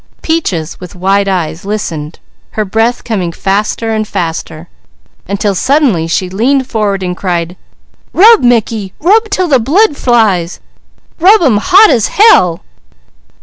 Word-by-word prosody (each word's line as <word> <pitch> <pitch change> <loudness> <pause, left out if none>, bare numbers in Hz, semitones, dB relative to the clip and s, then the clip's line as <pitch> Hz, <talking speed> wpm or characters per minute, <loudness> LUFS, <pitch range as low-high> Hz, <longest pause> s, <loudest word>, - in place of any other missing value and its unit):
Peaches 190 - -2
with 180 -1 -11
wide 195 +2 0
eyes 170 -3 -3
listened, 170 -7 -5 0.4
her 215 - 0
breath 225 +5 -1
coming 190 -7 -3
faster 210 +5 -2
and 215 -1 -2
faster, 165 -3 -5 0.6
until 200 +1 -1
suddenly 240 - +1
she 180 +3 -1
leaned 255 +8 0
forward 210 -5 -2
and 180 -1 -3
cried: 175 -2 -3 0.6
"Rub, 440 +4 +5
Mickey! 225 -5 0
Rub 435 +7 +2
'til 370 -3 -1
the 265 -3 +3
blood 300 - +1
flies! 210 -10 0 0.6
Rub 380 +3 +4
'em 250 -9 +3
hot 375 - +5
as 235 -6 +1
hell!" 390 - +3
210 Hz, 135 wpm, -11 LUFS, 180-270 Hz, 0.6 s, Rub